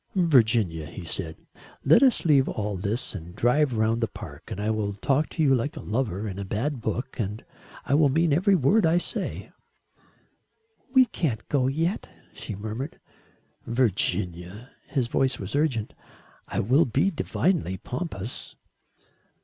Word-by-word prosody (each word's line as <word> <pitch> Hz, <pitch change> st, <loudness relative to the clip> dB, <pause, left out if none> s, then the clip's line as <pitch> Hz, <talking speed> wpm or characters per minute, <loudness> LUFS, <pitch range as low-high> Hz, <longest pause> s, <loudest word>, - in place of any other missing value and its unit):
"Virginia," 115 Hz, -, +3 dB
he 85 Hz, +4 st, -9 dB
said, 80 Hz, -1 st, -3 dB, 0.5 s
"let 155 Hz, -, +6 dB
us 260 Hz, -9 st, +4 dB
leave 140 Hz, -5 st, +4 dB
all 105 Hz, -1 st, -2 dB
this 100 Hz, +6 st, -2 dB
and 90 Hz, -2 st, -8 dB
drive 125 Hz, +5 st, +2 dB
round 110 Hz, +2 st, +1 dB
the 115 Hz, -, +2 dB
park -, -, -10 dB
and -, -, -5 dB
I 105 Hz, +2 st, 0 dB
will 105 Hz, -2 st, -1 dB
talk 135 Hz, +9 st, 0 dB
to 160 Hz, -, -1 dB
you 135 Hz, -3 st, +5 dB
like 130 Hz, +3 st, -1 dB
a -, -, -5 dB
lover 110 Hz, -3 st, -2 dB
in 95 Hz, -1 st, -5 dB
a -, -, -3 dB
bad 120 Hz, +7 st, -2 dB
book 125 Hz, +4 st, -3 dB
and 105 Hz, 0 st, -3 dB, 0.4 s
I -, -, 0 dB
will 145 Hz, -1 st, +5 dB
mean 160 Hz, +2 st, +2 dB
every 190 Hz, +6 st, +4 dB
word 190 Hz, -, +3 dB
I 165 Hz, +1 st, +4 dB
say." 175 Hz, -, -3 dB, 1.4 s
"We 260 Hz, -1 st, +6 dB
can't 130 Hz, -, -3 dB
go 130 Hz, -3 st, +2 dB
yet," 165 Hz, +8 st, -1 dB, 0.2 s
she 105 Hz, -, -6 dB
murmured. 110 Hz, +8 st, -5 dB, 0.7 s
"Virginia," 100 Hz, -2 st, -1 dB, 0.2 s
his 135 Hz, -5 st, 0 dB
voice 130 Hz, +2 st, +1 dB
was 95 Hz, +6 st, -5 dB
urgent 135 Hz, -8 st, 0 dB, 0.5 s
"I -, -, -1 dB
will 130 Hz, +10 st, +4 dB
be 140 Hz, -, +1 dB
divinely 160 Hz, -, 0 dB
pompous." 125 Hz, -, -6 dB
125 Hz, 155 wpm, -26 LUFS, 105-150 Hz, 1.4 s, let